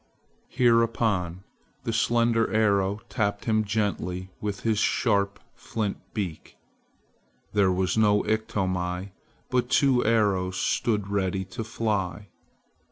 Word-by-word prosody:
Hereupon 115 Hz, -7 st, +2 dB, 0.4 s
the 115 Hz, -, -2 dB
slender 115 Hz, 0 st, +2 dB
arrow 100 Hz, -1 st, +2 dB
tapped 100 Hz, -4 st, -1 dB
him 110 Hz, -1 st, +2 dB
gently 95 Hz, -3 st, -2 dB
with 105 Hz, -2 st, -3 dB
his 110 Hz, -2 st, +1 dB
sharp 100 Hz, -5 st, +1 dB
flint 105 Hz, -3 st, -3 dB, 0.2 s
beak. 95 Hz, -8 st, -5 dB, 1.0 s
There 100 Hz, -2 st, +3 dB
was 90 Hz, +2 st, 0 dB
no 105 Hz, -1 st, +4 dB
Iktomi, 95 Hz, -3 st, -1 dB, 0.4 s
but 125 Hz, -1 st, +1 dB
two 130 Hz, -3 st, +3 dB
arrows 100 Hz, -5 st, +1 dB
stood 105 Hz, -4 st, 0 dB
ready 95 Hz, -1 st, -1 dB
to 115 Hz, +4 st, -6 dB
fly. 105 Hz, -3 st, -2 dB
105 Hz, 105 wpm, -26 LUFS, 95-115 Hz, 1.0 s, no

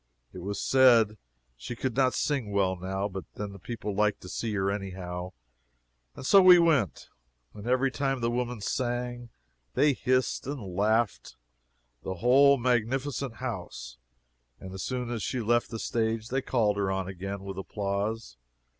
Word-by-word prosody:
It -, -, -8 dB
was 100 Hz, +3 st, -4 dB
said 120 Hz, -5 st, +5 dB, 0.4 s
she -, -, -7 dB
could 125 Hz, 0 st, -3 dB
not 130 Hz, -1 st, +2 dB
sing 135 Hz, -8 st, -1 dB
well, 95 Hz, -2 st, +1 dB
now, 95 Hz, +2 st, -3 dB
but 95 Hz, -2 st, -6 dB
then 105 Hz, -1 st, -5 dB
the 100 Hz, -, -11 dB
people 110 Hz, +1 st, -5 dB
liked 105 Hz, +1 st, +1 dB
to 90 Hz, -, -10 dB
see 115 Hz, +3 st, -3 dB
her, 95 Hz, 0 st, +1 dB
anyhow. 90 Hz, -2 st, -5 dB, 0.8 s
And -, -, -8 dB
so 195 Hz, +7 st, +7 dB
we 180 Hz, -1 st, +9 dB
went. 155 Hz, -, +2 dB, 0.4 s
And 105 Hz, +2 st, -9 dB
every 130 Hz, +2 st, +2 dB
time 135 Hz, -1 st, -1 dB
the 115 Hz, 0 st, 0 dB
woman 120 Hz, -2 st, -2 dB
sang 120 Hz, +1 st, -2 dB, 0.5 s
they 145 Hz, -1 st, +4 dB
hissed 130 Hz, -1 st, 0 dB
and 110 Hz, -11 st, -5 dB
laughed 110 Hz, +3 st, 0 dB, 0.7 s
the 95 Hz, -, -4 dB
whole 135 Hz, +7 st, +5 dB
magnificent 125 Hz, +1 st, -1 dB
house 90 Hz, -, -6 dB, 0.6 s
and 95 Hz, 0 st, -9 dB
as 95 Hz, -, -6 dB
soon 125 Hz, +1 st, -3 dB
as 115 Hz, -3 st, -3 dB
she 130 Hz, -, -2 dB
left 120 Hz, +1 st, +1 dB
the 115 Hz, -, -5 dB
stage 115 Hz, 0 st, -1 dB
they 135 Hz, +2 st, 0 dB
called 110 Hz, -6 st, +1 dB
her 100 Hz, -1 st, 0 dB
on 95 Hz, -1 st, -2 dB
again 95 Hz, +1 st, -6 dB
with 95 Hz, -1 st, -6 dB
applause. 100 Hz, -, -3 dB
115 Hz, 165 wpm, -28 LUFS, 100-125 Hz, 0.8 s, we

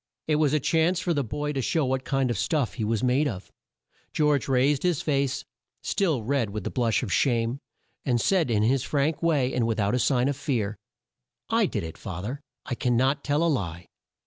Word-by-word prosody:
It 155 Hz, -1 st, +2 dB
was 150 Hz, -3 st, +3 dB
a 155 Hz, -, +2 dB
chance 165 Hz, +5 st, +2 dB
for 170 Hz, 0 st, 0 dB
the 145 Hz, -3 st, 0 dB
boy 150 Hz, +5 st, -3 dB
to 135 Hz, -, -1 dB
show 155 Hz, +3 st, +1 dB
what 130 Hz, 0 st, -1 dB
kind 135 Hz, -2 st, +1 dB
of 115 Hz, -, -2 dB
stuff 145 Hz, -7 st, 0 dB
he 115 Hz, -, -4 dB
was 110 Hz, +1 st, 0 dB
made 130 Hz, +4 st, +2 dB
of. 100 Hz, -7 st, -6 dB, 0.6 s
George 150 Hz, -3 st, +2 dB
raised 135 Hz, +2 st, +2 dB
his 175 Hz, -5 st, 0 dB
face, 140 Hz, -3 st, 0 dB, 0.4 s
still 160 Hz, -, 0 dB
red 130 Hz, -2 st, 0 dB
with 105 Hz, -1 st, -5 dB
the -, -, -3 dB
blush 115 Hz, -4 st, +1 dB
of 95 Hz, -, -2 dB
shame, 120 Hz, +1 st, +1 dB, 0.4 s
and 120 Hz, -3 st, +1 dB
said 175 Hz, -, +2 dB
in 105 Hz, -2 st, +2 dB
his 130 Hz, +4 st, +2 dB
frank 145 Hz, +1 st, 0 dB
way, 145 Hz, -6 st, +2 dB
and 120 Hz, -2 st, +1 dB
with 115 Hz, -1 st, -1 dB
out 100 Hz, 0 st, +1 dB
a 125 Hz, -, +2 dB
sign 125 Hz, 0 st, +2 dB
of 140 Hz, -, 0 dB
fear: 120 Hz, -7 st, -2 dB, 0.8 s
"I -, -, +3 dB
did -, -, -3 dB
it, 80 Hz, -1 st, -8 dB
fa 95 Hz, -3 st, -6 dB
ther, 130 Hz, +7 st, -5 dB, 0.2 s
I -, -, -3 dB
can 120 Hz, 0 st, 0 dB
not 135 Hz, +3 st, +1 dB
tell 145 Hz, +3 st, +1 dB
a -, -, +3 dB
lie." 85 Hz, -, -1 dB
130 Hz, 220 wpm, -26 LUFS, 115-150 Hz, 0.8 s, was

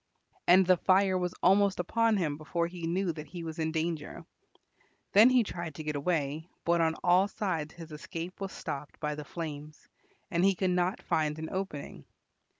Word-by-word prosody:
And 185 Hz, +2 st, +7 dB
the 185 Hz, 0 st, +5 dB
fire 190 Hz, +1 st, +3 dB
was 180 Hz, -1 st, -1 dB
almost 195 Hz, +1 st, +4 dB
upon 225 Hz, +4 st, +2 dB
him 155 Hz, -6 st, 0 dB
before 170 Hz, +3 st, -2 dB
he 170 Hz, -1 st, -5 dB
knew 180 Hz, +1 st, 0 dB
that 155 Hz, -1 st, -8 dB
he 175 Hz, -1 st, -7 dB
was 160 Hz, 0 st, -6 dB
in 160 Hz, 0 st, 0 dB
danger. 160 Hz, -1 st, -3 dB, 0.9 s
Then 215 Hz, +5 st, +8 dB
he 255 Hz, -2 st, +4 dB
tried 170 Hz, -6 st, -6 dB
to 155 Hz, -, -6 dB
get 150 Hz, -1 st, -3 dB
away, 155 Hz, +1 st, -1 dB, 0.2 s
but 170 Hz, 0 st, +3 dB
on 160 Hz, 0 st, +2 dB
all 180 Hz, +2 st, +5 dB
sides 170 Hz, -8 st, -3 dB
his 165 Hz, -2 st, -10 dB
escape 165 Hz, +4 st, -7 dB
was 195 Hz, -1 st, -3 dB
stopped 145 Hz, +1 st, -6 dB
by 150 Hz, -1 st, -2 dB
the 150 Hz, 0 st, -6 dB
flames 150 Hz, -2 st, -7 dB, 0.4 s
and 170 Hz, -1 st, +1 dB
he 195 Hz, 0 st, +4 dB
could 185 Hz, 0 st, 0 dB
not 180 Hz, +2 st, 0 dB
find 150 Hz, -1 st, 0 dB
an 160 Hz, 0 st, -5 dB
opening. 150 Hz, -, -5 dB
170 Hz, 185 wpm, -30 LUFS, 155-185 Hz, 0.9 s, Then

